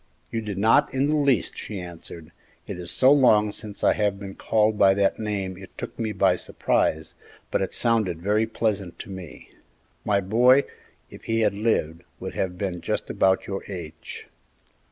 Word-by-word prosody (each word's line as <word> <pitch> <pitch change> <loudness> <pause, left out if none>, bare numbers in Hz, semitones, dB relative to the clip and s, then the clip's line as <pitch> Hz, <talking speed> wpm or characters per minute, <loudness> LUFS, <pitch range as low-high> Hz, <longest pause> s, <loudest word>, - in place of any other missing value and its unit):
"You 115 - -2
did 105 -3 -5
not 110 +3 +4
in 135 +3 0
the - - +2
least," 140 - +2
she 105 - -6
answered; 85 -2 -10 0.3
"it - - -6
is 90 0 -4
so 130 +1 +4
long 110 -7 +5
since 105 -1 -8
I - - +5
have 105 -2 0
been 100 -1 -7
called 110 +1 +1
by 95 -2 +5
that 100 -1 +1
name 100 -4 -3
it 95 -1 -13
took - - -7
me 110 -2 -1
by 95 -2 +2
surprise, 80 -2 -1 0.4
but - - +1
it 95 - -3
sounded 110 -8 +1
very 105 +5 +1
pleasant 105 -5 -2
to - - -9
me. 95 -4 -10 0.5
My 100 -1 +2
boy, 120 +8 +4 0.5
if - - -13
he 115 0 0
had 105 - +2
lived, 100 -6 -1 0.2
would - - -6
have 90 -1 -2
been 90 -3 -3
just - - -3
about 95 0 +2
your 95 0 -5
age." 85 -5 -8
100 Hz, 180 wpm, -24 LUFS, 95-110 Hz, 0.5 s, long